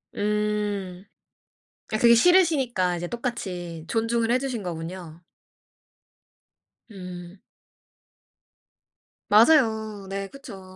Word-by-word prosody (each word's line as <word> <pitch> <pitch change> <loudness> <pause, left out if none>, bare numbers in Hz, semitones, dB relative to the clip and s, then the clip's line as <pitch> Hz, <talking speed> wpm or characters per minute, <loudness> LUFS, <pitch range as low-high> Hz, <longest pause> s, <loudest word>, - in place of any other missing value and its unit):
음. 205 -3 -2 0.9
아 215 - +1
그게 235 0 +6
싫으시니까 265 - +3
이제 175 +1 -4
똑같이 180 -9 -5
존중을 230 0 0
해 250 - +3
주신 255 -5 -4
거군요. 170 -1 -7 1.7
음. 180 -2 -10 1.9
맞아요. 220 -4 +3
네 195 0 -4
그쵸. 235 -6 -11
210 Hz, 165 characters per minute, -25 LUFS, 180-235 Hz, 1.9 s, 그게